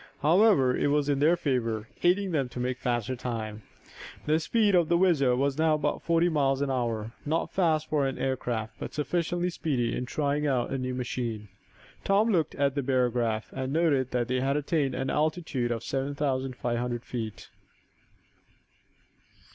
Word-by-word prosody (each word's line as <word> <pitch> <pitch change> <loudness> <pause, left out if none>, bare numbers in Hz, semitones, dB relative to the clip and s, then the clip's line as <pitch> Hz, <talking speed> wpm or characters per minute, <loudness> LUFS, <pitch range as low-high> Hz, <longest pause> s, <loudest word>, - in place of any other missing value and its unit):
However, 160 - +5
it - - +1
was 145 0 +1
in 140 -1 +1
their 160 +4 +4
favor, 115 -7 -1
aiding 185 +2 +2
them 140 -6 0
to 125 - -7
make 125 +1 -2
faster 120 0 -1
time. 110 -3 -5 0.6
The 155 +1 +2
speed 210 +4 +2
of 175 -3 +3
the 170 - +4
WHIZZER 155 -9 +3
was 140 +2 0
now 160 -1 +4
about 150 - -1
forty 170 0 +2
miles 140 -5 +1
an 140 -1 0
hour, 115 -3 -2
not 160 +3 -1
fast 160 -5 +1
for 145 -3 +1
an 135 - -4
air 130 -1 0
craft, 115 -3 -4
but - - -6
sufficiently 175 +3 -1
speedy 130 -8 -1
in 125 - -3
trying 150 +1 0
out 125 -4 0
a 135 - -1
new 130 0 -3
machine. 120 -4 -4 0.5
Tom 210 +3 +3
looked 165 -6 +1
at 140 -1 +1
the 140 - -1
barograph, 120 -5 0
and 130 0 -3
noted 150 -6 +2
that 120 -2 -1
they 130 0 0
had 135 +2 +1
attained 145 -3 0
an 130 +1 -2
altitude 150 -5 -1
of 115 -1 -2
seven 135 +1 -2
thousand 135 -3 -1
five 120 -1 -2
hundred 120 -1 -3
feet. 110 -4 -6
135 Hz, 180 wpm, -28 LUFS, 125-155 Hz, 0.6 s, However